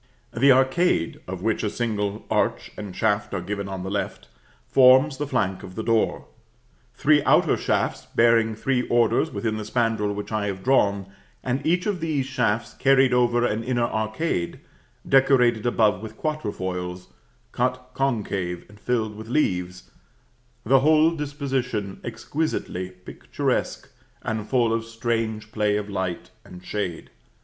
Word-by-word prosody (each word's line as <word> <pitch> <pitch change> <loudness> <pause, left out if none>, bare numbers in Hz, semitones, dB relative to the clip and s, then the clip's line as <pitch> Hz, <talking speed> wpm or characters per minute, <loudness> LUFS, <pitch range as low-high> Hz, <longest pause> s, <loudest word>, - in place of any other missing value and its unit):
The 135 +4 +5
arcade, 130 - +2
of 90 0 -6
which 110 -1 0
a 105 - 0
single 105 -2 -2
arch - - 0
and 100 -3 -7
shaft 105 -1 0
are - - -1
given 100 +2 -4
on 95 -1 -5
the 95 - -5
left, 100 - -4 0.4
forms 130 - +5
the 145 +1 -3
flank 95 -8 -1
of 90 - -10
the 110 - -3
door; 115 -1 +1 0.7
three 150 -1 +3
outer - - +4
shafts - - -1
bearing 115 -1 +4
three 125 +2 -1
orders 120 -1 +2
within 110 +1 -2
the 110 - -4
spandril 110 -2 0
which 105 +2 -6
I 105 -1 -1
have 95 -1 -5
drawn, 100 -7 +2 0.4
and 130 +2 -1
each 175 +4 +1
of 205 -4 -1
these 155 -5 -1
shafts 115 -4 -1
carried 135 -1 +4
over 120 -1 +3
an 110 0 -1
inner 120 0 0
arcade, 110 - -2 0.5
decorated 125 -4 +4
above 105 -5 +2
with 110 0 -9
quatre 155 -8 -2
foils, 90 -1 -5 0.4
cut 125 +1 -2
concave 100 -9 -2
and 105 0 -16
filled 110 -2 -1
with 110 +1 -9
leaves, 90 -9 -1 0.7
the 135 +4 +4
whole 155 +3 +4
disposition 135 -9 -3
exquisitely 140 - -3
picturesque 90 0 -3 0.4
and 110 -1 -3
full 120 -3 +2
of 115 0 -1
strange 115 -1 -3
play 105 -1 +1
of 105 0 -5
light 95 -3 -3
and 90 0 -13
shade. 95 -5 -4
115 Hz, 150 wpm, -24 LUFS, 100-130 Hz, 0.7 s, The